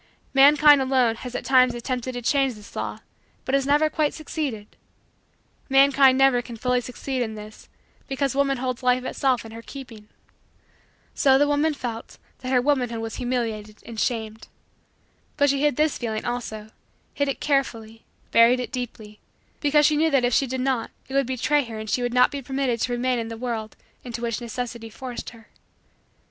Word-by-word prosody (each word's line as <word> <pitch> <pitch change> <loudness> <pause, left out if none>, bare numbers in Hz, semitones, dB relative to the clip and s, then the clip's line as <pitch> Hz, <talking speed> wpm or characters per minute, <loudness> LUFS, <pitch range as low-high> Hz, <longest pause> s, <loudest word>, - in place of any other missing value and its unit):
Mankind, 290 +1 +7
alone, 255 -4 +2
has 250 0 -8
at - - -4
times 255 -2 +4
attempted 250 +1 -3
to 245 0 -6
change 270 -1 +1
this 210 0 -14
law - - -4 0.4
but 260 - -3
has 275 0 +2
never 295 +2 +4
quite 305 -1 -1
succeeded. 285 -9 -5 0.9
Mankind 270 -1 +5
never 270 -2 +4
can 235 -1 -9
fully 250 +2 +1
succeed 255 +2 -4
in 220 -2 -3
this 215 0 -11 0.4
because 270 -1 -1
woman 275 -1 +1
holds 255 -1 -3
life 250 0 +2
itself 255 -2 0
in 225 - -10
her 230 +1 -9
keeping. 230 -5 -11 1.0
So 265 -1 +4
the 290 +1 +3
woman 290 +1 +1
felt 235 -4 -6 0.2
that 255 - -5
her 255 - +4
womanhood 250 -5 +1
was 225 0 -5
humiliated 225 -4 -3
and 230 -1 -7
shamed. 220 -2 -2 0.9
But 285 -2 +4
she 275 0 -1
hid 295 -3 +2
this 305 +1 +1
feeling 220 -3 -3
also, 220 -3 -5 0.4
hid 285 - 0
it 275 - -2
carefully, 230 -6 -1 0.3
buried 235 +2 +5
it 250 - -4
deeply, 220 -4 -7 0.4
because 295 0 +3
she 300 - +4
knew 320 +1 +3
that 275 -4 +2
if 245 - 0
she 270 - +3
did 260 +1 -3
not 255 -3 -1 0.2
it - - -8
would 275 -2 +2
betray 285 +3 +1
her 225 -2 -7
and 215 0 -6
she 245 - 0
would 245 0 -1
not 250 +2 +4
be 285 -1 -5
permitted 265 -2 -1
to 245 - 0
remain 245 0 0
in 225 - -3
the 225 0 -7
world 225 -3 -4 0.3
into 240 -1 -6
which 230 0 -2
necessity 235 -1 -5
forced 250 +2 -7
her. 225 -1 -17
250 Hz, 185 wpm, -24 LUFS, 230-275 Hz, 1.0 s, Mankind